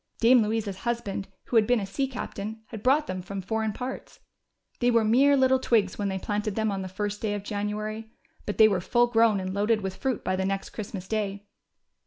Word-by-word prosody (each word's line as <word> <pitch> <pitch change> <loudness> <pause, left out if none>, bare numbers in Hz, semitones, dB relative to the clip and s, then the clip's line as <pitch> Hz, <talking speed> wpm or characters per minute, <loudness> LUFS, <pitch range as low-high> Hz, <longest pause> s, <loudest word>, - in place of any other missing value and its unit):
Dame 240 +1 +6
Louisa's 215 -2 -1
husband, 210 -3 -3 0.2
who 240 - 0
had 215 -1 +4
been 245 -1 +3
a 200 - -3
sea 270 +8 -2
captain, 220 -4 -6
had 220 -3 -7
brought 275 +6 +3
them 185 -9 -4
from 195 +2 -6
foreign 220 +3 -1
parts. 250 +5 -7 0.6
They 245 - +3
were 230 -2 +4
mere 270 +6 +5
little 260 0 +4
twigs 215 -7 +1
when 205 - 0
they 190 -1 -2
planted 210 +1 -2
them 220 -1 0
on 195 -1 -3
the 190 - -4
first 205 +2 -4
day 210 -2 -1
of 205 - -5
January, 215 +2 -4 0.4
but 205 - -3
they 220 - +8
were 195 -4 0
full 240 +6 +3
grown 225 -3 +3
and 185 0 -4
loaded 210 +2 +1
with 190 -1 -4
fruit 260 -4 -2
by 185 - 0
the 190 - -1
next 195 0 -2
Christmas 200 -3 -6
day. 205 -2 -2
215 Hz, 220 wpm, -27 LUFS, 200-230 Hz, 0.6 s, they